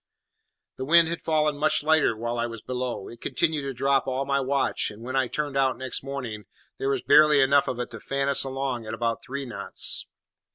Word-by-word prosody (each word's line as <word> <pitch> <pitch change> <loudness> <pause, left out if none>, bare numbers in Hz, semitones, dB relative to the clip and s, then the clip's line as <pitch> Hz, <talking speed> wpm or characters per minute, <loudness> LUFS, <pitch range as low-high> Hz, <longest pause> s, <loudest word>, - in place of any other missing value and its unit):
The 130 - -4
wind 165 +2 +5
had 170 - -4
fallen 155 -2 +1
much 155 -1 +2
lighter 155 -7 +3
while 120 +1 -3
I 120 - 0
was 115 -2 -9
below, 125 -5 -4
it 115 - -12
continued 160 -3 0
to 140 0 -4
drop 135 +2 +1
all 130 +1 -1
my 140 0 +1
watch, 135 +1 0
and 105 +2 -11
when 130 +2 -5
I 135 -2 +2
turned 145 +1 -3
out 135 -1 +2
next 130 -1 -4
morning 125 -7 -6 0.3
there 135 - -1
was 135 -3 -1
barely 150 0 +6
enough 140 +1 +4
of 125 - -3
it 125 - -4
to 115 - -8
fan 140 +4 -2
us 140 - +4
along 135 -3 -3
at 110 - -4
about 115 0 -2
three 140 +1 -5
knots. 105 -5 -2
135 Hz, 215 wpm, -26 LUFS, 120-140 Hz, 0.3 s, barely